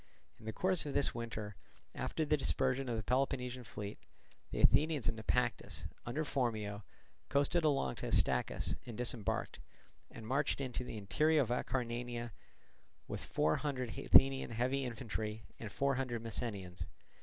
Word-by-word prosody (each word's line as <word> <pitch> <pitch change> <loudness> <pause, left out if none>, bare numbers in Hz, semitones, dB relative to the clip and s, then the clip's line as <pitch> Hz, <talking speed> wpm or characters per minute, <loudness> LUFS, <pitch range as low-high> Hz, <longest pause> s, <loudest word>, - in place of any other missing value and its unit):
In 110 - -14
the 110 - -2
course 185 - +1
of 140 - -4
this 140 - +3
winter, 110 -3 -4 0.4
after 160 - -1
the 150 - +4
dispersion 135 -2 +1
of 115 - 0
the 110 - -2
Peloponnesian 125 0 0
fleet, 105 -2 -6 0.5
the - - -4
Athenians 155 -4 +4
in 115 - +2
Naupactus, 110 -1 -1 0.2
under 150 +6 -1
Phormio, 110 -7 -1 0.5
coasted 145 +4 +3
along 145 -3 +2
to - - -3
Astacus - - +2
and 115 -3 -6
disembarked, 120 -4 -1 0.5
and 115 - -9
marched 140 +5 +1
into 125 -2 -2
the 115 - -6
interior 150 +10 +3
of 120 - -5
Acarnania 120 -1 -2 0.8
with - - -4
four 80 0 +2
hundred 130 -6 -2
Athenian 135 0 +6
heavy 130 +4 0
infantry 110 -2 -4 0.2
and 110 -3 -6
four 140 +5 +2
hundred 125 -3 -2
Messenians. 100 -5 -3
125 Hz, 145 wpm, -36 LUFS, 110-135 Hz, 0.8 s, Athenian